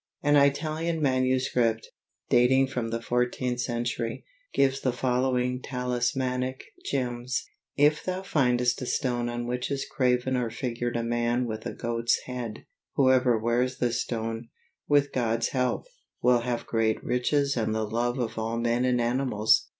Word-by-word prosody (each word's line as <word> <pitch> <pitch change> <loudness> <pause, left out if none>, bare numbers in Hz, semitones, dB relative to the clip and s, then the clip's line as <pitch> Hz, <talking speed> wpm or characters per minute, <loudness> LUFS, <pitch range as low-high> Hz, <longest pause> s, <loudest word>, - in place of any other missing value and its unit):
An 145 0 +4
Italian 155 +4 +2
manuscript, 130 -4 +1 0.4
dating 130 +2 +4
from 125 -4 -3
the 115 0 -3
fourteenth 125 +1 0
century, 120 -1 -3 0.3
gives 135 0 +2
the 130 - +1
following 125 0 0
talismanic 125 +1 -1 0.2
gems: 125 -2 -2 0.3
If 150 +1 +4
thou 185 +1 -3
findest 125 -7 +1
a 125 - -4
stone 120 -2 0
on 120 0 -3
which 125 +1 -2
is 140 -1 -2
graven 125 -1 +1
or 125 -2 0
figured 120 0 -3
a 115 - -1
man 120 +1 0
with 110 -2 -4
a - - -5
goat's 115 0 0
head, 125 -4 -6 0.3
whoever 130 -3 +4
wears 120 +3 0
this 120 -1 0
stone, 115 0 -4 0.4
with 145 -1 +3
God's 115 -2 0
help, 125 -1 0 0.3
will 125 -1 +4
have 120 0 -3
great 110 -1 0
riches 140 +3 +1
and 110 -2 0
the 110 0 0
love 120 +3 -1
of 115 -3 -2
all 115 +1 -2
men 120 +1 +1
and 125 -1 +2
animals. 120 -3 +2
125 Hz, 150 wpm, -27 LUFS, 120-130 Hz, 0.4 s, An